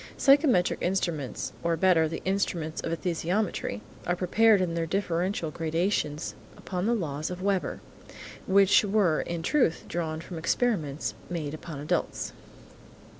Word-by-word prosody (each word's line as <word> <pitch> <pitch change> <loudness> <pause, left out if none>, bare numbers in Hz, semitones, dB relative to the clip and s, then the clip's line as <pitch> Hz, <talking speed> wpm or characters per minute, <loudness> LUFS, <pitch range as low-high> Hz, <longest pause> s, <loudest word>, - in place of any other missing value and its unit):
Psychometric 275 - +4
instruments, 170 -7 -2
or 170 0 0
better, 165 -2 +4
the 165 - -5
instruments 180 -5 -1
of 165 - -3
esthesiometry, 170 - -1 0.3
are 175 - +2
prepared 210 +4 +4
in 180 -2 0
their 165 -1 -1
differential 180 -2 -1
gradations 165 -1 -1 0.2
upon 180 +1 -3
the 235 - +3
laws 155 -7 -3
of 180 0 -6
Weber, 195 -2 0 0.7
which 195 +1 +5
were 195 -6 +2
in 170 -1 -4
truth 245 - +2
drawn 160 -2 -3
from 165 +1 -7
experiments 165 - 0 0.2
made 155 -4 -3
upon 155 -2 -7
adults. 150 - -2
175 Hz, 130 wpm, -28 LUFS, 160-195 Hz, 0.7 s, which